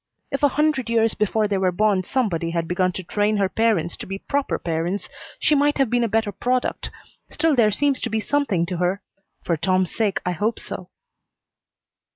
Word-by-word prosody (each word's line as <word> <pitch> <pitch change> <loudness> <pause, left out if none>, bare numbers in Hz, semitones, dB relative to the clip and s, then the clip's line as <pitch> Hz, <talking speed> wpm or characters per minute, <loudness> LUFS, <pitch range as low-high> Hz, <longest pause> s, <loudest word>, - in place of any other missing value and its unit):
If 275 - -2
a 290 - +6
hundred 300 -5 +1
years 225 -1 +3
before 215 0 +1
they 200 -2 0
were 185 -1 +2
born 205 +1 +2
somebody 175 -8 -1
had 165 -1 -2
begun 180 +1 +1
to 185 - -5
train 210 +4 0
her 195 -1 +2
parents 205 -6 +1
to - - -8
be 195 +1 -4
proper 280 +7 -1
parents 170 +4 -2 0.3
she - - +2
might 290 0 +3
have 270 -5 +1
been 245 0 +2
a - - +2
better 220 -1 0
product, 250 +6 -1 0.4
still 325 -1 +1
there 230 -4 +5
seems 275 +6 +1
to 235 - -2
be 220 0 0
something 215 -8 0
to 175 +1 -4
her. 180 +3 0 0.4
For 170 - +1
Tom's 185 +2 0
sake 210 -4 +1
I 180 - +1
hope 210 +7 -1
so." - - -7
210 Hz, 195 wpm, -23 LUFS, 185-245 Hz, 0.4 s, a